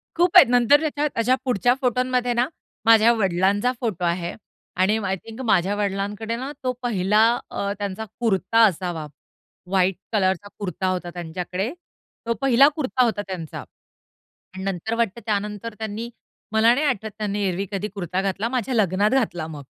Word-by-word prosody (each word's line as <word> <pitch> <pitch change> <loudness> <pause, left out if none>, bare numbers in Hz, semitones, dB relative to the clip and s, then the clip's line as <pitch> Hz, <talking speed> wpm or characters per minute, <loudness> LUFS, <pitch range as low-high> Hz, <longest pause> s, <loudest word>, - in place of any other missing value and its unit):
खूप 350 +1 +2
आहेत, - - +9
नंतर. 245 +4 +5
त्याच्या 300 -1 0
अशा 250 +3 +3
पुढच्या 245 0 +2
फोटोमध्ये 250 0 +1
ना, 240 +2 +1 0.4
माझ्या 225 0 +7
वडिलांचा 200 +2 +1
फोटो 205 -7 -2
आहे. 170 0 -1 0.4
आणि 190 +4 +2
आय 190 0 0
थिंक, 225 +6 -10
माझ्या 205 -5 +2
वडिलांकडे 205 +2 -2
ना 265 +4 -5
तो 255 - +1
पहिला 210 -3 +2 0.3
अ, 200 - -3
त्यांचा 205 +2 -4
कुर्ता 225 0 +2
असावा. 175 -4 -1 0.6
व्हाईट 190 -1 +2 0.2
कलरचा 190 -2 +1
कुर्ता 185 -1 -3
होता 180 -1 -2
त्यांच्याकडे. 180 +5 -4 0.5
तो 230 - +1
पहिला 270 +1 +6
कुर्ता 260 -4 +1
होता 225 -4 0
त्यांचा 175 -6 -6 0.9
आणि 190 0 -7
नंतर, 195 +3 -3
वाटतं 235 -1 -1
त्यानंतर 210 +1 -3
त्यांनी 220 +2 -4 0.4
मला 225 +2 +5
नाही 295 +4 0
आठवत 220 -6 -1
त्यांनी 205 -1 -2
एरव्ही 185 +2 -2
कधी 200 +1 -2
कुर्ता 185 0 -2
घातला, 195 +3 -1
माझ्या 255 0 -2
लग्नात 200 -1 +2
घातला 175 -9 -3
मग. 155 -2 -8
210 Hz, 155 wpm, -23 LUFS, 190-235 Hz, 0.9 s, आहेत